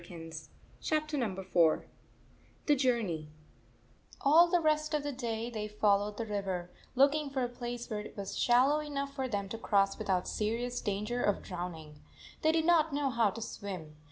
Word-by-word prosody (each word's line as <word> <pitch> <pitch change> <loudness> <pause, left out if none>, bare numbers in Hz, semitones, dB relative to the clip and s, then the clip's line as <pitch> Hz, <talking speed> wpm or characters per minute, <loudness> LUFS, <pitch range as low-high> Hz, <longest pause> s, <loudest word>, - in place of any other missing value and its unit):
IV 170 - -14 0.7
THE 310 -1 +1
JOURNEY 295 -4 -1
IV 185 -5 +1 0.8
THE 295 - +4
JOURNEY 230 - 0
i 155 0 -26
ALL 320 +5 +7
the 355 - +3
rest 305 -1 +1
of 295 - -1
the 290 - -2
day 235 -2 -3
they 215 -2 -3
followed 210 0 +1
the 230 - -2
river, 195 -4 -3 0.2
looking 285 +2 +4
for 270 -2 -1
a - - +1
place 240 0 -6
where 215 -2 -3
it 210 - -9
was 200 -1 -5
shal 250 +3 +4
low 300 +1 +2
7 300 -1 -6
enough 275 0 -2
for 265 -2 -2
them 200 -5 -2
to 225 - -5
cross 195 -3 +2
without 190 -4 0
se 210 0 -1
rious 245 +1 -3
danger 210 +4 -1
of 205 - +1
drowning. 165 -5 -7 0.4
They 315 - +4
did 320 0 +1
not 325 -2 +4
know 285 -2 +1
how 230 -3 +3
to 225 +2 -5
swim. 180 -9 -7
230 Hz, 190 wpm, -32 LUFS, 195-280 Hz, 0.8 s, ALL